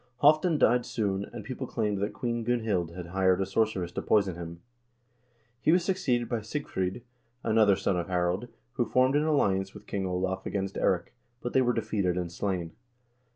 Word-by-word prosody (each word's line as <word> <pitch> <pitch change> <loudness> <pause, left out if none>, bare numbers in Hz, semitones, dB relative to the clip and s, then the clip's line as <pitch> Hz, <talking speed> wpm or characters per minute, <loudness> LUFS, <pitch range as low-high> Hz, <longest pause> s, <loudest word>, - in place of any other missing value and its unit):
Halvdan 155 +3 +5
died 125 -2 +4
soon, 100 -4 -1
and 120 -3 -7
people 130 +2 -5
claimed 105 -4 -1
that 100 +1 -1
Queen 120 -1 -2
Gunhild 110 -8 0
had 90 -2 -7
hired 95 0 +2
a 95 - +1
sorceress 95 -3 0
to - - -3
poison 100 -3 +2
him. 85 0 -8 1.0
He - - +4
was 175 0 +3
succeeded 145 -12 +1
by 120 -1 -1
Sigfr0d, 110 -4 -3 0.4
another 110 -3 +4
son 95 - 0
of 85 - -3
Harald, 90 +4 0 0.3
who 120 -3 +1
formed 130 +2 +3
an 150 +1 +3
alliance 95 -11 +1
with 105 - -11
King 95 -1 -2
Olav 95 +1 -1
against 95 -1 -2
Eirik, 85 +2 0 0.3
but 120 - -5
they 130 - +5
were 125 -1 +3
defeated 100 -6 0
and 90 -2 -2
slain. 90 -2 -2
105 Hz, 180 wpm, -29 LUFS, 95-120 Hz, 1.0 s, Halvdan